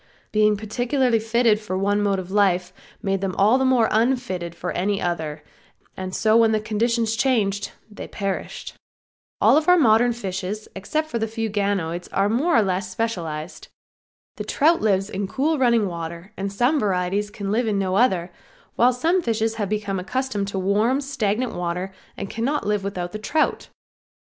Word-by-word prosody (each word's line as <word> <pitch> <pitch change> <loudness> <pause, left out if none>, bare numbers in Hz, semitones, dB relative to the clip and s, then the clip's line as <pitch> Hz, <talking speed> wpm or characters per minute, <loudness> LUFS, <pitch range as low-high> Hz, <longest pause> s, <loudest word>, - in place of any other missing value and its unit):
Being 210 -1 +3
particularly 240 +3 0
fitted 225 -1 +2
for 200 -4 -4
one 205 +2 +1
mode 200 -1 +1
of 185 0 -6
life 185 -3 +2 0.3
made 195 -1 0
them 190 -2 -2
all 215 +7 +4
the 265 - +2
more 250 -4 +4
unfitted 220 -7 0
for 180 +1 -4
any 200 +2 0
other, 160 -4 -3 0.5
and 185 0 -5
so 220 -1 +3
when 225 -1 +4
conditions 225 +1 0
changed 210 -5 0 0.2
they 210 - -9
perished. 195 -2 -4 0.7
All - - +5
of 310 - 0
our 360 - +7
modern 240 -4 +4
fishes 200 -1 -5
except 310 +11 -2
the 225 -1 -1
few 225 0 -3
ganoids 195 -4 -1
are 195 +1 +2
more 265 +10 +2
or 225 - +5
less 190 +2 -1
specialized. 175 -8 -4 0.7
The - - -4
trout 325 +4 +2
lives 195 -2 +2
in 200 -1 -3
cool 290 +8 0
running 235 -4 +3
water 170 +3 -7
and 195 +1 -3
some 245 +9 +2
varieties 195 0 0
can 200 -1 -5
live 230 +2 +1
in 210 -2 +1
no 190 -1 0
other, 190 -6 +2 0.4
while 245 +2 +4
some 335 +9 +1
fishes 225 -5 0
have 200 - -1
become 205 -2 -2
accustomed 210 +1 -2
to 200 - -4
warm, 210 +7 +2
stagnant 250 -4 -1
water 180 +2 -3 0.2
and 200 - -4
cannot 235 +5 -2
live 210 -1 0
with 200 0 -4
the 180 +4 -4
trout. 305 +8 0
210 Hz, 170 wpm, -23 LUFS, 190-235 Hz, 0.7 s, our